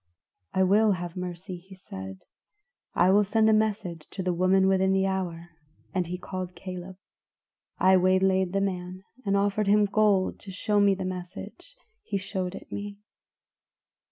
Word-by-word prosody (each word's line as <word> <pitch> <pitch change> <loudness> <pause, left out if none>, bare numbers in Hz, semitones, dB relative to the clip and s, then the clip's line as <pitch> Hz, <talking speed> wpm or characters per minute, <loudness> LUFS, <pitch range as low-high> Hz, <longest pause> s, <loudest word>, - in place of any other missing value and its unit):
"'I 190 - +4
will 210 +3 +4
have 175 -2 -5
mercy,' 180 0 -6
he 190 +2 -15
said. 95 - -9 0.7
'I 180 +2 +5
will 205 +2 +5
send 220 +2 +2
a 220 - +5
message 205 -7 -1
to 190 - -5
the 180 -1 0
woman 185 +2 +3
within 190 0 +3
the 190 0 +2
hour,' 175 -3 -3 0.4
and 180 -3 0
he 180 +1 -4
called 185 -1 -6
Caleb. 185 0 -8 0.8
I 190 0 +5
waylaid 185 0 +3
the 195 +1 0
man, 185 -1 -3 0.2
and 200 0 +3
offered 205 +1 +1
him 210 +1 +5
gold 205 -2 +2
to 200 - -12
show 205 +2 0
me 200 -1 +4
the 190 -1 -4
message; 185 - -7 0.3
he 200 - -3
showed 190 -1 -3
it - - -11
me. 205 0 -5
190 Hz, 160 wpm, -27 LUFS, 180-200 Hz, 0.8 s, I